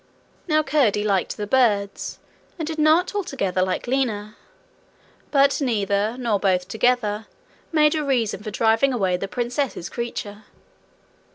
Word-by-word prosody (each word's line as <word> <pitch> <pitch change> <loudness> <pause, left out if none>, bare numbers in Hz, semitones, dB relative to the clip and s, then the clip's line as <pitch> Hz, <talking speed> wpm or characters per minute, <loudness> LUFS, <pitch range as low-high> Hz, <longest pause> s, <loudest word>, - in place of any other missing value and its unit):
Now 310 -1 +3
curdie 265 -9 +2
liked 195 -3 0
the 210 - -3
birds, 205 -4 +1 0.4
and 325 - -3
did 320 -1 -4
not 315 +5 +3
altogether 260 - -1
like 185 0 -1
Lina. 225 -5 -1 0.9
But 280 0 +3
neither, 210 -3 0
nor 230 -5 0
both 185 -2 +1
together, 220 -2 0 0.4
made 300 -2 +4
a 310 -1 -1
reason 240 -8 0
for 215 - -5
driving 225 +5 +2
away 190 -6 +1
the 195 - -4
princess's 240 -3 -3
creature. 220 -3 -6
230 Hz, 130 wpm, -23 LUFS, 205-275 Hz, 0.9 s, made